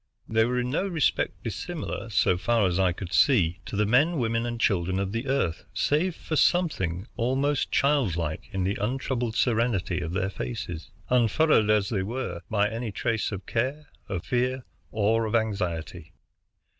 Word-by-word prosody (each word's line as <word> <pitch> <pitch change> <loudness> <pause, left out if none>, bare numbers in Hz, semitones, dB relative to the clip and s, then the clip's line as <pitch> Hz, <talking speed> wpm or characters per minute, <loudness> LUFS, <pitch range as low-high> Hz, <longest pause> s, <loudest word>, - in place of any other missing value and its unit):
They 110 0 +3
were 125 +1 -1
in 125 0 -2
no 185 +7 0
respect 165 -6 0
dissimilar, - - -5
so 90 - +3
far 115 +4 +2
as 90 0 +1
I 95 -2 +3
could 90 0 -7
see, 95 - +4
to - - -5
the 105 +1 +2
men, 145 +10 +3
women, 115 -1 0
and 120 -1 -4
children 95 -3 +1
of 95 0 -1
the 115 +5 -3
Earth, 130 -12 0
save 165 +4 +1
for 155 - -4
something 100 - +1
almost 135 +4 0
childlike 95 - +1
in 95 -2 -1
the 95 +2 -1
untroubled 120 0 -1
serenity 115 -7 +1
of 85 0 -4
their 95 +1 -1
faces, 80 +5 -5 0.2
unfurrowed 125 -1 +4
as 105 -2 +3
they 100 -5 0
were 115 -3 -4
by 105 -1 +2
any 115 +1 -4
trace 110 +2 -1
of 95 -3 -6
care, 135 +6 -2 0.2
of 95 -4 -3
fear, 125 +1 0 0.2
or 110 +1 +1
of 110 - -1
anxiety. 95 -8 -2
110 Hz, 170 wpm, -26 LUFS, 95-125 Hz, 0.2 s, see